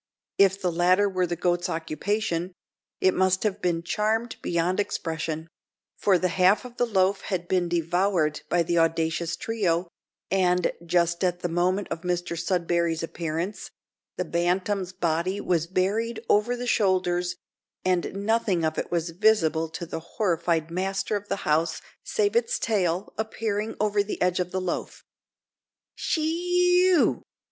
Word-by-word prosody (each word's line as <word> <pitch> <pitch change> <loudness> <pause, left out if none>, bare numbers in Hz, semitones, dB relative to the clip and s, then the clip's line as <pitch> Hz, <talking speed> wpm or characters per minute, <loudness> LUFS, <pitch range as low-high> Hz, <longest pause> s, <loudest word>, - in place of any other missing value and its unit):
If 195 0 +5
the 180 -3 0
latter 180 +4 +3
were 185 -2 0
the 175 - -2
goat's 175 +1 0
occupation, 175 +2 -2 0.5
it 185 - +4
must 185 0 +2
have 210 -1 -1
been 170 -2 0
charmed 220 +6 -1
beyond 175 +2 0
expression; 160 -4 -3 0.5
for 195 -3 +3
the 185 +1 0
half 185 +6 +3
of 245 -1 -11
the 245 - +1
loaf 195 -2 +2
had 180 -3 -2
been 180 -2 +1
devoured 170 -1 +1
by 175 -1 +3
the 170 +1 +1
audacious 165 0 +1
trio, 185 -6 -1 0.4
and, 180 -2 +2
just 170 +1 +1
at 180 -1 0
the - - 0
moment 180 +4 +1
of 165 - -4
Mr 175 -1 -2
Sudberry's 170 -1 0
appearance, 165 +4 -4 0.5
the 180 - -1
bantam's 180 +3 0
body 175 +2 -1
was 170 -4 0
buried 210 +6 0
over 210 +4 +3
the 245 - -4
shoulders, 180 -5 +1 0.5
and 180 -2 +1
nothing 210 -7 +1
of 155 0 -1
it - - -4
was 170 -1 -1
visible 165 -5 +2
to 170 - -6
the 165 - -5
horrified 170 -3 -1
master 195 +3 -1
of 205 0 -4
the - - -1
house 155 +1 +1 0.2
save 430 -2 0
its 475 +1 +2
tail, 190 -4 0
appearing 220 0 -2
over 210 -1 +2
the 200 - -4
edge 180 0 +1
of 180 -1 -1
the 185 +1 -2
loaf. 180 -1 -4 0.9
"She 320 - -1
ee 355 +2 +3
ew!" 360 -4 +3
180 Hz, 155 wpm, -26 LUFS, 170-205 Hz, 0.9 s, If